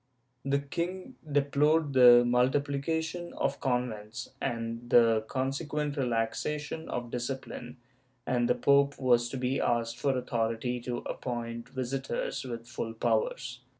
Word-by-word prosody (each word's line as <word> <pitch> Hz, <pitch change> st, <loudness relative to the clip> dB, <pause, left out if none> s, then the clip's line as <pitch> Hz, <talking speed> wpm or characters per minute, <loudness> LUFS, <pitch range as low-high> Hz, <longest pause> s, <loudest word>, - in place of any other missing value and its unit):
The 140 Hz, +1 st, +1 dB
king 175 Hz, -, -4 dB, 0.2 s
deplored 145 Hz, +2 st, +2 dB
the 120 Hz, -2 st, +8 dB
multiplication 145 Hz, +7 st, 0 dB
of 140 Hz, 0 st, -1 dB
convents, 125 Hz, -2 st, -2 dB
and 115 Hz, -1 st, -3 dB
the 115 Hz, -2 st, +5 dB
conseciuent 145 Hz, +3 st, -2 dB
relaxation 140 Hz, +5 st, -2 dB
of 120 Hz, -1 st, -4 dB
discipline, 125 Hz, 0 st, -5 dB, 0.5 s
and 120 Hz, -1 st, +1 dB
the -, -, +4 dB
pope 140 Hz, +2 st, +3 dB
was 120 Hz, -2 st, +3 dB
to 135 Hz, -, -4 dB
be 130 Hz, +1 st, 0 dB
asked 115 Hz, 0 st, 0 dB
for 135 Hz, -2 st, +1 dB
authority 120 Hz, 0 st, -1 dB
to 120 Hz, 0 st, -3 dB
appoint 120 Hz, -1 st, -4 dB
visitors 130 Hz, -1 st, -3 dB
with 120 Hz, -2 st, -6 dB
full 115 Hz, -1 st, -5 dB
powers. 120 Hz, +2 st, -1 dB
125 Hz, 120 wpm, -30 LUFS, 120-140 Hz, 0.5 s, the